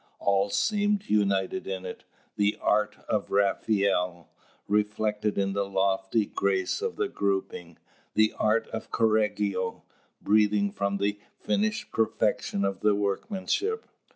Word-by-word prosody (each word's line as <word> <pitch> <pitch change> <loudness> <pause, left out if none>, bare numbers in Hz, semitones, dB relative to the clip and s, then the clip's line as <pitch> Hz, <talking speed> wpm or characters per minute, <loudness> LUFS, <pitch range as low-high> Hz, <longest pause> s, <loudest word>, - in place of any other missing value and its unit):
All 100 0 +2
seemed 205 - +1
united 100 -3 +1
in 95 -1 -4
it: 90 - -8 0.3
the 105 0 +1
art 105 0 +1
of 105 -2 -1
Raphael, 100 -3 +1 0.4
reflected 105 0 0
in 100 0 +1
the 100 0 -1
lofty 95 +2 +1
grace 95 -2 0
of 460 0 -2
the 425 - 0
grouping; 95 - -2 0.4
the 110 0 +4
art 110 +1 +2
of 110 - -6
Correggio, 105 -4 0 0.4
breathing 105 -1 +3
from 100 0 -1
the 100 +1 -1 0.2
finished 215 +2 -1
perfection 105 -2 0
of 100 -1 -2
the 105 -1 +3
workmanship. 200 - -1
100 Hz, 125 wpm, -27 LUFS, 100-110 Hz, 0.4 s, the